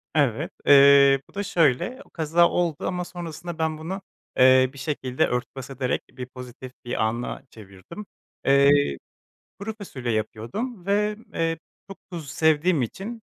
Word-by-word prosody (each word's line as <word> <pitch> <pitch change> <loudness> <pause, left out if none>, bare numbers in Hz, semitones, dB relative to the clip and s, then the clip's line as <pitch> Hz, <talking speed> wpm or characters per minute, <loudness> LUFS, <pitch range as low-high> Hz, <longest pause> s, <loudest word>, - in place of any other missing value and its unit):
Evet, 135 -7 +1 0.2
ııı, 140 -1 +7
bu - - -21
da 205 - -3
şöyle: 175 - +1
O - - -24
kaza 165 +1 +2
oldu 170 -2 -1
ama 180 -1 -2
sonrasında 170 -1 -7
ben 160 -1 0
bunu, 180 +5 -5 0.4
eee, 130 0 +6
bir - - -14
şekilde 130 -2 -1
örtbas 125 +2 -4
ederek 130 -1 -2
bir 125 - -7
pozitif 125 0 -10
bir 120 - -1
ana 115 +4 -3
çevirdim. 100 - -12 0.4
Iıı, 140 - +4 0.6
kuru 215 +2 -5
fasulye 130 - -4
yapıyordum 175 - -4
ve, 210 +1 +1 0.2
ııı, 165 0 0 0.3
çok 195 - -9
tuz 165 -5 -7
sevdiğim 160 0 +2
için 205 - -6
145 Hz, 145 wpm, -24 LUFS, 130-175 Hz, 0.6 s, ııı